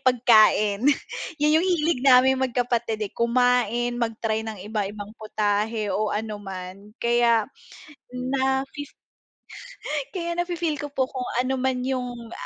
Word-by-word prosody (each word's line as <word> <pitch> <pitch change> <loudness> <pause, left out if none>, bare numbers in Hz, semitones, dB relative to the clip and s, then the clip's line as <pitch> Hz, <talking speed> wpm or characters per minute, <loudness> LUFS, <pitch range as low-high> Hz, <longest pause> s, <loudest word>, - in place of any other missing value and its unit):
pagkain, 215 -4 +4 0.6
'yun 300 +1 +3
'yung 360 - 0
hilig 335 -6 +1
naming 265 0 +5
magkapatid, 240 -3 -1
eh, - - -8
kumain, 240 0 +1
mag-try 225 -1 -1
ng 220 -1 -6
iba-ibang 205 -1 -4
putahe 215 0 -1
o 215 +2 0
ano 210 0 -4
man 195 +2 -9
kaya 235 -2 +3 0.7
nafi 265 +2 -1 1.3
Kaya 340 -2 -3
nafi-feel 345 -4 -1
ko 290 - -5
po 260 -2 0
kung 255 -2 -4
ano 260 +1 0
man 255 -1 0
'yung, 250 -3 -4
240 Hz, 120 wpm, -24 LUFS, 215-265 Hz, 1.3 s, naming